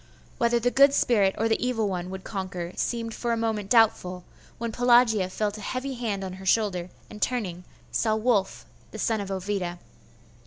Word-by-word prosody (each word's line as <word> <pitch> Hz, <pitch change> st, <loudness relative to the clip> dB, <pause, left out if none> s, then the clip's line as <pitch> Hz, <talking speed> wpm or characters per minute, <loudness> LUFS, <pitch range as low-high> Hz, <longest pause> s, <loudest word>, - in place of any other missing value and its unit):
Whether 235 Hz, -1 st, +3 dB
the 245 Hz, +1 st, +1 dB
good 275 Hz, +1 st, +6 dB
spirit 200 Hz, -8 st, +3 dB
or 225 Hz, -, +1 dB
the 225 Hz, -, 0 dB
evil 235 Hz, -4 st, 0 dB
one 180 Hz, -2 st, -3 dB
would 190 Hz, 0 st, -7 dB
conquer, 185 Hz, -3 st, -5 dB
seemed 230 Hz, -1 st, -2 dB
for 240 Hz, +1 st, -2 dB
a -, -, 0 dB
moment 220 Hz, -3 st, -2 dB
doubtful, 195 Hz, -6 st, +3 dB, 0.3 s
when 235 Hz, 0 st, -3 dB
Pelagia 235 Hz, -5 st, +4 dB
felt 210 Hz, +2 st, -2 dB
a -, -, -9 dB
heavy 260 Hz, +5 st, -3 dB
hand 220 Hz, -6 st, -3 dB
on 185 Hz, -1 st, -5 dB
her -, -, -9 dB
shoulder, 185 Hz, -4 st, +1 dB, 0.2 s
and 210 Hz, -, -11 dB
turning, 185 Hz, -8 st, -2 dB, 0.3 s
saw 220 Hz, -1 st, +1 dB
Wulf 220 Hz, -3 st, 0 dB, 0.2 s
the -, -, -9 dB
son 220 Hz, -2 st, 0 dB
of 200 Hz, -, -6 dB
Ovida. 190 Hz, -2 st, -3 dB
215 Hz, 185 wpm, -26 LUFS, 190-235 Hz, 0.3 s, good